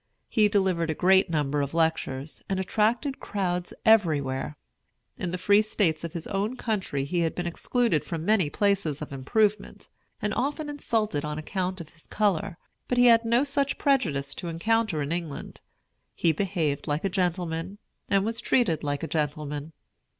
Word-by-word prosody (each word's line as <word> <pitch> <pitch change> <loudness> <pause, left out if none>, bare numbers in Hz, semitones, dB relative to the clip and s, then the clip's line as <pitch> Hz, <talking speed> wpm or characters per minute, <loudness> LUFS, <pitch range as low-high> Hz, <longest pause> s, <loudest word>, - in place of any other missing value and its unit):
He 215 -3 +4
delivered 190 -5 +1
a 160 - 0
great 190 +2 +4
number 150 -2 0
of 140 +3 -3
lectures, 160 -3 -1
and 190 -1 0
attracted 225 +8 0
crowds 180 -3 -2
everywhere. 150 -10 +2 0.6
In 180 - -3
the 180 - -3
Free 200 +3 +4
States 185 -7 0
of 170 -1 -5
his 170 -2 -5
own 205 +5 -2
country 190 - -2
he 175 +5 -1
had 165 -1 0
been 175 - -3
excluded 175 - 0
from 165 -1 -5
many 200 -7 +3
places 190 -6 0
of 145 - -8
improvement, 210 +11 0 0.3
and 210 0 -1
often 295 +4 -2
insulted 220 - -1
on 150 0 -3
account 185 +3 -3
of 165 -3 -8
his 165 0 -18
color; 200 -3 0 0.3
but 250 - 0
he 245 - +6
had 230 -1 +6
no 235 +3 +3
such 280 0 -1
prejudice 180 - +1
to 175 - -6
encounter 175 -1 0
in 140 - -4
England. 165 -4 -5 0.5
He 165 - +3
behaved 160 -5 -1
like 150 +4 -1
a - - +4
gentleman, 180 -1 -2 0.3
and 195 0 +3
was 230 +1 -2
treated 170 - +2
like 145 +1 -2
a - - -2
gentleman. 150 -1 -3
180 Hz, 170 wpm, -27 LUFS, 155-215 Hz, 0.6 s, he